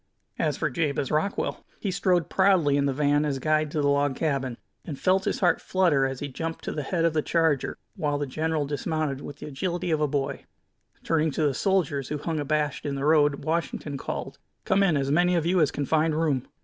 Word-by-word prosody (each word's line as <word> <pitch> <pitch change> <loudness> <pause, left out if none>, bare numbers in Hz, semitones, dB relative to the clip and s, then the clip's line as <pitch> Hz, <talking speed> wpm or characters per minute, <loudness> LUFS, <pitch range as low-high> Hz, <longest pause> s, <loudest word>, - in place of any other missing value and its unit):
As - - 0
for - - -1
Jabez 140 -1 -1
Rockwell, 155 +6 -1 0.2
he 200 - -2
strode 180 -3 +1
proudly 185 -7 +3
in 140 0 +2
the - - +1
van 145 +1 +2
as 145 -3 -1
guide 155 +2 +1
to 150 +1 -1
the 145 - +2
log 140 -1 +2
cabin, 135 -6 -1 0.3
and 150 -5 -6
felt 190 +4 +2
his - - -1
heart 175 -3 +3
flutter 165 -8 +2
as 135 -1 -6
he 145 - -2
jumped 165 +4 -5
to - - -3
the 150 - -3
head 165 +3 0
of 165 - +2
the 155 - +2
charger, 160 -4 +1 0.2
while 145 -2 -1
the 145 - -2
general 155 +2 -1
dismounted 145 0 -2
with 145 - -8
the - - -8
agility 175 +4 -3
of 155 -1 +1
a 150 - +3
boy. 140 -1 -2 0.6
Turning 160 -1 +1
to 155 +2 -1
the 145 -2 +2
soldiers, 145 -6 0
who 150 - -2
hung 155 +2 -3
abashed 150 0 -1
in 140 -1 -2
the 135 +1 -2
road, 145 -2 +3
Washington 160 -2 -2
called: 135 - -5 0.3
"Come 195 +1 +3
in, 175 -6 +3
as 135 0 0
many 175 +3 +3
of 165 -2 +1
you 180 +1 +3
as 150 - +4
can 145 - -3
find 155 +2 +2
room!" 145 -6 0
150 Hz, 225 wpm, -26 LUFS, 140-165 Hz, 0.6 s, as